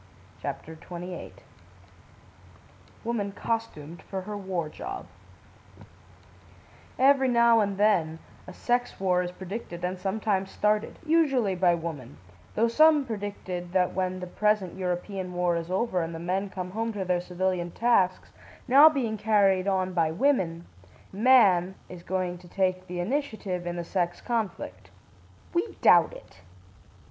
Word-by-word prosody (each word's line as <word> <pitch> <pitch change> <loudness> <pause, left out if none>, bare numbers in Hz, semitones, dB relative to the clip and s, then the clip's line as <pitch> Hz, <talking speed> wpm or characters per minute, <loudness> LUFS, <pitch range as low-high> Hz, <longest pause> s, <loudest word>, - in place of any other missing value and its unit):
CHAPTER 160 - -5
XXVIII 175 +2 -8 1.7
WOMAN 220 -4 -2
COSTUMED 195 -9 -4
FOR 190 -1 -5
HER 210 +3 -6
WAR 190 -5 -3
JOB 385 - -7 1.9
Every 270 0 +5
now 235 -2 +5
and 200 -2 0
then 180 -7 +2 0.3
a - - -7
sex 245 0 -1
war 180 -2 +2
is 180 - -3
predicted, 180 -1 -7
and 180 0 -3
sometimes 195 0 -1
started, 210 +1 0
usually 280 -10 +2
by 180 -1 +3
woman, 155 -6 -7 0.4
though 230 +2 +3
some 300 +4 +5
predicted 200 -5 -5
that 185 -1 +2
when 185 -1 -2
the - - -4
present 210 0 0
European 185 0 -3
war 175 -1 +1
is 165 0 -4
over 185 0 0
and 165 0 -4
the - - -6
men 185 +4 -2
come 185 -1 -6
home 225 +3 -2
to 195 -2 -3
their 180 -1 +1
civilian 180 -1 -2
tasks, 190 -3 +1 0.4
now 280 +5 +8
being 245 -8 -2
carried 200 -3 +3
on 185 -1 0
by 165 -3 +2
women, 170 - 0 0.5
man 195 -5 +4
is 180 -1 -9
going 180 -1 -2
to 180 - -15
take 185 0 -1
the 180 0 -5
initiative, 205 -5 -2
in 175 - -3
the 175 - -3
sex 175 0 -2
conflict. 230 -5 -4 0.6
We 355 +5 -1
doubt 175 -2 +6
it. - - -14
190 Hz, 140 wpm, -27 LUFS, 180-220 Hz, 1.9 s, now